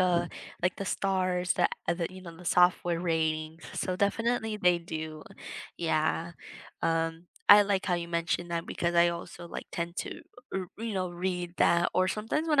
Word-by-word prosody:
uh 175 -1 +3 0.4
like, 180 0 +1
the 200 - -4
stars 185 -2 +1
that - - +2 0.2
that 170 +1 0
you 185 0 -10
know, 170 -2 -9
the 180 - -12
software 175 -1 +3
ratings, 160 -1 -1
so 185 -1 -2
definitely, 225 +2 +1
they 180 -2 +4
do, 160 -2 -6 0.6
yeah. 165 +1 0 0.5
Um, 165 +1 0 0.2
I 205 0 +11
like 200 -1 0
how 180 - +2
you 170 -1 -3
mentioned 170 +1 -1
that, 170 +1 -2
because 170 0 -1
I 170 0 +6
also, 170 0 -6
like, - - -6
tend 170 +1 -3
to, - - -7 0.3
er 190 -1 -1
you 225 -2 -3
know, 185 -1 0
read 180 0 -3
that, 170 0 +4
or 185 0 +4
sometimes 225 +11 -1
when 300 -2 +5
175 Hz, 175 wpm, -29 LUFS, 170-185 Hz, 0.6 s, I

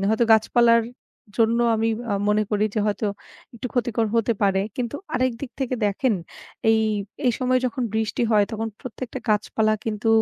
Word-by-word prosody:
হয়তো 220 +2 +3
গাছপালার 230 +1 +4 0.5
জন্য 230 0 +3 0.2
আমি 225 +1 +1 0.2
আ - - +1 0.2
মনে 210 +1 +3
করি 210 0 +2
যে - - 0
হয়তো 210 +1 -1 0.5
একটু 235 +1 -5
ক্ষতিকর 235 -2 +1
হতে 230 0 +2
পারে। 195 -1 +3 0.2
কিন্তু 245 +1 -3 0.2
আরেকদিক 255 0 -1
থেকে 260 -1 -1
দেখেন 215 +4 +1 0.6
এই, 220 0 +4 0.5
এই 245 - +4
সময় 255 0 +2
যখন 255 +1 -3
বৃষ্টি 220 +1 -1
হয় 210 -2 +5
তখন 225 +1 -2
প্রত্যেকটা 255 0 -6
গাছপালা 215 +1 +2
কিন্তু 220 0 -2
225 Hz, 160 wpm, -23 LUFS, 215-245 Hz, 0.6 s, হয়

